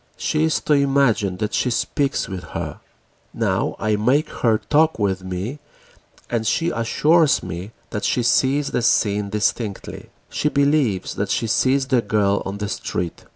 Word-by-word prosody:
She 155 0 0
is 160 - +1
to 150 - +1
imagine 135 -9 +2
that 105 +1 -3
she 125 - +1
speaks 140 +3 -1
with 95 -2 -6
her. - - -6 0.6
Now - - 0
I 110 0 0
make 130 +8 +2
her 115 -3 +1
talk 155 +6 +2
with 95 -3 -1
me 95 +10 -5 0.7
and 115 -2 -2
she 165 +8 +1
assures 150 +7 +2
me 90 +4 -6 0.2
that 105 - -4
she 125 - +1
sees 135 +4 +2
the 125 - 0
scene 105 -3 +1
distinctly. 105 0 -3 0.2
She 150 - 0
believes 140 -9 +1
she 115 - 0
sees 130 +4 +2
the 130 -2 +2
girl 100 -2 +1
on 100 +1 -4
the 105 0 -3
street. 90 -3 -4
115 Hz, 155 wpm, -21 LUFS, 100-140 Hz, 0.7 s, imagine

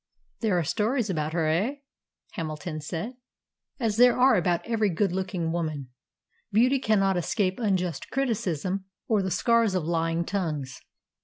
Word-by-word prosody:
"There 215 -6 +1
are 175 - +1
stories 220 - 0
about 155 -2 -2
her, 165 -2 +1
eh?" 195 - +1 0.6
Hamilton 155 -2 -5
said. 175 - -5 0.6
"As 225 -4 0
there 245 0 +6
are 255 0 +6
about 175 -3 +1
every 220 -3 +1
good 190 +2 +1
looking 185 -3 -2
woman. 155 -6 -3 0.6
Beauty 250 +6 +4
cannot 195 -5 +2
escape 185 +2 0
unjust 185 - -1
criticism 195 - -1 0.2
or 215 -3 +2
the 190 - -1
scars 230 +1 +2
of 180 - 0
lying 165 +1 0
tongues." 155 -9 -3
185 Hz, 145 wpm, -27 LUFS, 165-220 Hz, 0.6 s, there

